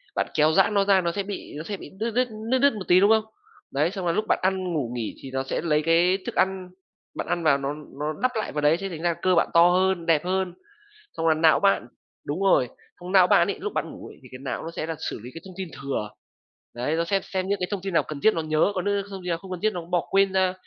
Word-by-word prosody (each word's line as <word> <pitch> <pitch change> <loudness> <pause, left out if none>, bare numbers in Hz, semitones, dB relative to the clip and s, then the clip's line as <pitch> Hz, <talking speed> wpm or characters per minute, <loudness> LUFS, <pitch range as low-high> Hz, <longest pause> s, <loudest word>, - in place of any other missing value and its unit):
bạn - - 0
kéo 155 0 +4
giãn 195 +2 +4
nó 200 -1 +3
ra 195 -2 +4
nó 170 - -1
sẽ 200 +3 -3
bị 200 0 -7
nó 155 - -5
sẽ 200 +4 -5
bị 145 - -10
đứt 230 +2 -1
đứt 250 +3 +1 0.2
đứt 260 - +3
đứt 280 -1 +4
một 200 -3 -7
tí, 180 - +6
đúng 200 +2 +5
không? 220 -1 +3 0.5
Đấy, 150 +5 +1
xong 190 -2 -5
là 170 - +2
lúc 215 +6 -1
bạn - - +2
ăn, 185 -2 0
ngủ, 135 -7 -2
nghỉ, 115 -3 -4
thì 135 - -8
nó 130 0 -1
sẽ - - -3
lấy 155 -2 +1
cái 170 +4 +3
thức - - -5
ăn 190 -1 0 0.5
bạn - - -4
ăn 170 - -1
vào 140 -3 +4
nó 140 +1 -3 0.3
nó 150 +1 -2
đắp 255 0 +2
lại 220 - -2
vào 150 - -2
đấy, 150 +2 +4
thế 195 - -4
thành 165 -3 -7
ra 175 -1 +1
cơ 185 -1 +3
bạn 170 - +3
to 170 +1 +7
hơn, 185 -1 +1
đẹp 165 -1 +2
hơn. 185 -1 -1 0.6
Xong 165 - -1
là 160 - +5
não 160 0 +4
bạn 195 -10 +2 0.4
đúng 150 +6 -3
rồi, 185 -11 +3 0.3
xong 180 +2 -7
não 185 -2 +7
bạn - - +4
ấy, - - -2
lúc - - -4
bạn - - -2
ngủ - - -10
ấy - - -14
thì - - -14
cái 130 - -8
não 130 - -4
nó 165 - -6
sẽ 160 - -4
là 165 -1 -4
xử - - -6
lý 125 - -8
cái 165 - -8
thông 185 - -10
tin 190 -3 -5
thừa. 120 -6 -3 0.7
Đấy, 130 +6 -1
nó 165 - +1
sẽ 195 +3 +1
xem 185 -1 -3
những 200 +1 0
cái 180 - -1
thông 200 -3 -2
tin 195 -2 -4
nào - - +3
cần 150 -2 -6
thiết 220 - +5
nó 165 - -1
nhớ, 155 +5 +1
có 185 - 0
những 200 -1 0
thông 195 -1 -7
tin 180 - -4
nào 165 - 0
không 185 +2 -12
cần 180 - -4
thiết 215 -1 +1
nó 175 - -4
bỏ 175 0 -1
quên 195 -1 +3
ra. 190 -1 +2
180 Hz, 300 wpm, -25 LUFS, 160-195 Hz, 0.7 s, to